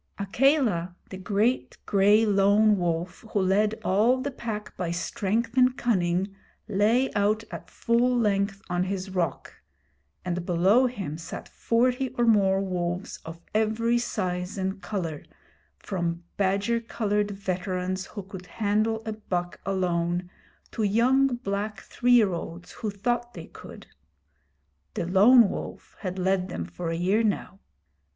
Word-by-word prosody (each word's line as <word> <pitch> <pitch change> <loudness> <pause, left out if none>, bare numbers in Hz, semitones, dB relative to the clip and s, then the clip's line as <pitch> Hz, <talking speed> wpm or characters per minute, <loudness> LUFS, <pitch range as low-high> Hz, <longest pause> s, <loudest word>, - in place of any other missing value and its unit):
Akela, 200 - +1 0.2
the 190 - -6
great 210 +6 0
gray 205 +2 +4
Lone 205 +1 +4
Wolf, 175 +2 -2
who 205 - +2
led 205 +3 +2
all 225 +7 +3
the 280 +2 -3
Pack 220 -5 -6
by 180 -2 -3
strength 205 +7 -2
and 255 0 +4
cunning, 190 -3 0 0.3
lay 220 +6 +2
out 210 +2 +1
at - - -8
full 245 +1 +1
length 200 -2 0
on 180 0 0
his 190 0 -4
rock, 170 -6 -2 0.7
and 180 -1 -2
below 190 +9 +4
him 195 -11 -5
sat 165 - -7
forty 250 +3 +1
or 240 - +3
more 195 -4 +4
wolves 180 -1 -3
of 165 +1 -9
every 220 +2 +1
size 180 -5 -3
and 190 +1 -3
colour, 170 -9 -4 0.6
from 170 -2 -3
badger 200 +4 +1
coloured 210 -3 -1
veterans 185 -1 -3
who 205 - -7
could 185 -1 -10
handle 215 +3 0
a 220 - -3
buck 180 -5 -4
alone, 175 -2 -1 0.4
to - - -4
young 240 +6 +3
black 210 -4 -3
three 245 0 +1
year 215 -6 +5
olds 170 +1 -7
who 220 - -4
thought 240 +4 -2
they 165 -2 -7
could. - - -12 1.1
The - - -2
Lone 210 +6 +6
Wolf - - -7
had 185 -2 -4
led 185 0 0
them 85 - -4
for 125 - -5
a 165 - -1
year 185 +6 +2
now. 200 -2 -2
200 Hz, 140 wpm, -26 LUFS, 180-225 Hz, 1.1 s, Lone